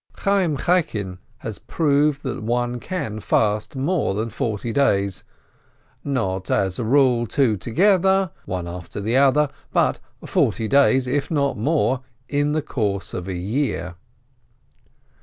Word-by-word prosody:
Chayyim 195 -7 +1
Chaikin 105 - 0 0.2
has 110 -2 -6
proved 145 -2 +1
that 130 -4 -4
one 120 +2 -1
can 110 - -4
fast 105 +5 0
more 140 - 0
than 110 +2 -2
forty 110 +2 -3
days; 100 -8 +1 0.8
not, 95 -10 -2
as 95 +1 0
a - - -1
rule, 125 -1 +3
two 125 -2 +2
together, 190 - +2
one 90 -2 -4
after 90 +2 -7
the 110 +4 -1
other, 140 +2 +4 0.2
but - - +2 0.3
forty 110 - +1
days, 135 0 +4
if 140 +3 -1
not 140 -3 +1
more, 130 +1 +1 0.3
in 145 +1 0
the 155 -1 0
course 105 -9 -2
of 90 0 -5
a 95 - -3
year. 90 - -2
125 Hz, 135 wpm, -22 LUFS, 105-145 Hz, 0.8 s, other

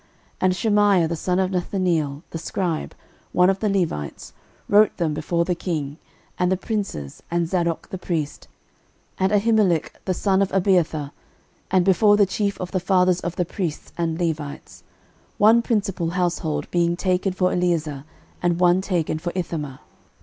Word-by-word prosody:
13:024:006 - - -34 0.3
And 185 0 +3
Shemaiah 205 -4 +3
the 170 - -1
son 180 +3 -1
of 190 0 +1
Nethaneel 175 -5 -1
the - - -4
scribe, 170 -2 -3 0.4
one 180 +1 +5
of 195 - -3
the 215 - 0
Levites, 170 - -2 0.3
wrote 210 +1 +4
them 165 -4 0
before 170 +3 0
the 180 - 0
king, 155 -5 -3 0.4
and 180 0 +2
the 190 - +2
princes, 195 - -4
and 170 0 0
Zadok 170 -2 -1
the 190 - -6
priest, 160 -5 -3 0.7
and 190 +1 +2
Ahimelech 205 -5 +2
the 185 - 0
son 195 0 +2
of 195 - +1
Abiathar, 175 -6 +1 0.6
and 185 -2 +3
before 205 +2 +5
the 205 - +5
chief 200 +1 -2
of 180 -1 -5
the 185 - 0
fathers 180 -1 +3
of 175 0 -4
the 180 - 0
priests 170 -3 -5
and 165 -1 -2
Levites: 155 -4 -4 0.6
one 220 +3 +6
principal 195 -7 -1
household 170 -4 -1
being 170 -1 +2
taken 185 +1 0
for 185 0 +1
Eleazar, 160 -6 0 0.4
and 175 -1 +1
one 180 +1 +4
taken 170 -5 -1
for 175 +2 -3
Ithamar. 150 -7 -4
180 Hz, 165 wpm, -23 LUFS, 165-190 Hz, 0.7 s, one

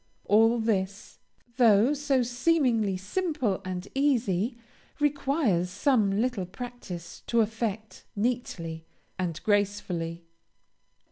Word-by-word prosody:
All 225 +3 +5
this, 200 -3 -2 0.4
though 230 +1 +5
so 280 -3 +1
seemingly 240 - +1
simple 250 - -1
and 185 -1 -5
easy, 240 -5 +1 0.4
requires 280 - +1
some 205 -1 +2
little 230 -6 -1
practice 185 -6 -8
to 235 -1 +3
effect 220 -1 -3
neatly 180 -8 -3 0.3
and 170 -3 -2
gracefully. 190 -5 -1
220 Hz, 90 wpm, -28 LUFS, 190-250 Hz, 0.4 s, All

